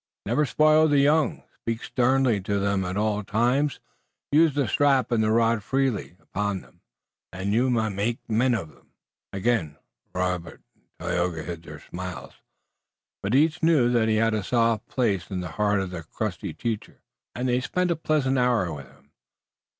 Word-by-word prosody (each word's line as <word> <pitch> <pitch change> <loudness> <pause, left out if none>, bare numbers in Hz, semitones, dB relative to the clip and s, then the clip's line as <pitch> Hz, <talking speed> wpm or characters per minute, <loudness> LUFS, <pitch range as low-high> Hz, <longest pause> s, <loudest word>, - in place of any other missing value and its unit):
Never 135 +7 +1
spoil 155 +2 +4
the 145 -1 +3
young. 145 0 +2 0.2
Speak 115 0 -3
sternly 125 -4 +2
to 100 +2 -1
them 100 -1 0
all 105 +3 0
the 105 - -4
time. 120 +8 +2 0.6
Use 155 0 +4
the 140 -4 +1
strap 135 +2 +2
and 115 -2 +2
the 110 - +2
rod 115 0 +3
freely 130 -7 -1
upon 100 -1 -3
them - - -22 0.5
and 95 +2 -2
you 125 +4 +2
may 115 -3 +1
make 105 +4 -1
men 120 +2 +2
of 85 -8 -4
them." - - -27 0.4
Again 95 -7 -1 0.3
Robert 90 -2 -3
and - - -39 0.2
Tayoga 85 -2 -1
hid 85 +1 -6
their 75 -2 -11
smiles, 90 0 -7 0.9
but 100 +5 0
each 155 +3 +3
knew 150 -7 +4
that 115 -2 +2
he 110 - +3
had 115 +1 +2
a 110 - 0
soft 115 +1 +1
place 100 -9 -1
in 95 - -3
the 90 - -5
heart 105 -1 +3
of 95 -1 -3
the 90 -2 -5
crusty 80 - -4
teacher, 115 -3 -5 0.3
and 125 +1 -2
they 125 0 +1
spent 180 +7 0
a - - +2
pleasant 145 -4 +1
hour 115 -9 +1
with 70 -3 -9
him. - - -24
115 Hz, 175 wpm, -25 LUFS, 95-130 Hz, 0.9 s, spoil